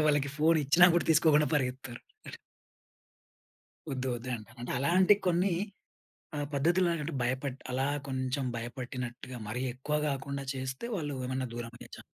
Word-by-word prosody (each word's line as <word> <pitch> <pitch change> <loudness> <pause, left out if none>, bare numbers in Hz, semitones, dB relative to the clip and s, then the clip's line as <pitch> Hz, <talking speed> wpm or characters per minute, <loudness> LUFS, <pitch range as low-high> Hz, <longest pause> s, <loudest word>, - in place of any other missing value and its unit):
తర్వాత - - +3
వాళ్ళకి 145 -2 +3
ఫోనిచ్చినా 155 +1 +5
గూడా 175 - +3
తీసుకోకుండా 150 -1 +5
పరిగెత్తుతారు. 125 -3 -2 1.9
ఒద్దు 130 0 -2
ఒద్దు 125 +2 -7
అంటారు. 115 +2 -12
అంటే 120 - -4
అలాంటి 180 +8 +5
కొన్ని 180 +2 +3 0.8
ఆహ్, 145 -1 -2
పద్ధతుల్లాగంటె 165 +1 +1
భయపట్టి, 130 +2 -2
అలా 130 +2 0 0.2
కొంచెం 130 +1 -1
భయపెట్టినట్టుగా 125 +1 -5
మరీ 120 +4 -3
ఎక్కువ 140 +4 -2
గాకుండా 140 0 -3
చేస్తే, 130 - -4
వాళ్ళు 150 -6 -3
ఏమన్నా 130 0 -1
దూరమయ్యే 120 0 -8
చా - - -11
135 Hz, 130 wpm, -31 LUFS, 130-150 Hz, 1.9 s, ఫోనిచ్చినా